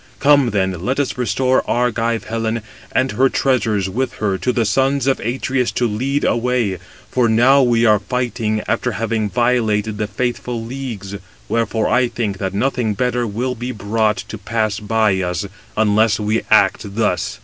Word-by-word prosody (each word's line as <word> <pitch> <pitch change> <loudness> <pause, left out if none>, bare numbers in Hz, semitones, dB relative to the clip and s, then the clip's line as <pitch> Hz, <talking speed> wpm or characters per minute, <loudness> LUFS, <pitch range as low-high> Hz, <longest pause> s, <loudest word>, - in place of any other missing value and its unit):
Come 145 -3 +4
then, 95 -4 -1
let 130 +6 -1
us 140 - -1
restore 125 +2 +1
Argive 115 -1 0
Helen, 115 0 -2 0.3
and 130 +1 +1
her 135 +1 +3
treasures 115 -9 +1
with 130 +8 -2
her 100 -3 -1
to 125 - 0
the 120 -2 0
sons 135 +5 +1
of 135 -1 +1
Atreus 125 +1 -1
to 120 - +1
lead 130 +7 -1
away; 120 -6 0 0.3
for 125 -3 +2
now 130 +5 +5
we 120 -2 +3
are 105 -2 +5
fighting 115 -1 -2
after 125 - 0
having 110 0 -1
violated 110 -3 0
the 105 - -1
faithful 120 +2 -3
leagues. 115 -5 -6 0.3
Wherefore 115 -1 0
I 125 0 +3
think 105 -5 -3
that 95 0 -3
nothing 115 -1 0
better 125 +1 0
will 120 +5 -2
be 125 +1 -5
brought 110 0 0
to 110 - -7
pass 110 0 -1
by 105 -2 +1
us, 90 +2 -2 0.3
unless 110 0 +3
we 110 +1 0
act 100 -1 +3
thus." 105 -6 0
115 Hz, 165 wpm, -19 LUFS, 105-125 Hz, 0.3 s, now